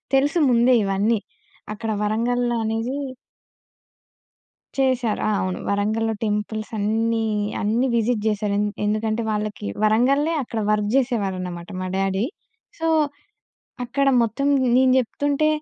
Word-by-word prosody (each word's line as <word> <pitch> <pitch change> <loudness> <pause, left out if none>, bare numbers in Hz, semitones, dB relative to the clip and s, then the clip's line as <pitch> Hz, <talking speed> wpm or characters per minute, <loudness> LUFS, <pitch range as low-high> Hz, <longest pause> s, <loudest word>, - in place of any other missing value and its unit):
తెలుసు 290 +5 +2
ముందే 240 +1 +5
ఇవన్నీ. 200 +3 +1 0.5
అక్కడ 225 +1 -4
వరంగల్‌లో 240 +3 0
అనేది 225 +5 -2 1.8
చేశారు. 255 -5 +1
ఆ! - - +2
అవును. 185 -1 -2
వరంగల్‌లో 215 +3 0
టెంపుల్స్ 215 +1 -2
అన్నీ 225 +2 0 0.4
అన్నీ 225 +5 +1
విజిట్ 230 -1 +1
జేశారు. 210 -1 0
ఎన్ 210 - +1 0.2
ఎందుకంటే 215 +2 0
వాళ్ళకి 210 - -3 0.2
వరంగల్లే 265 +9 +3
అక్కడ 230 -2 -4
వర్క్ 210 -1 +1
జేసేవారనమాట 190 -9 -1
మా 185 - -3
డ్యాడీ. 195 +2 0 0.5
సో 325 - 0 1.0
అక్కడ 275 +3 +1
మొత్తం 235 +5 0 0.3
నేను 260 0 +5
జెప్తుంటే, 285 +4 0
225 Hz, 110 wpm, -22 LUFS, 210-245 Hz, 1.8 s, ముందే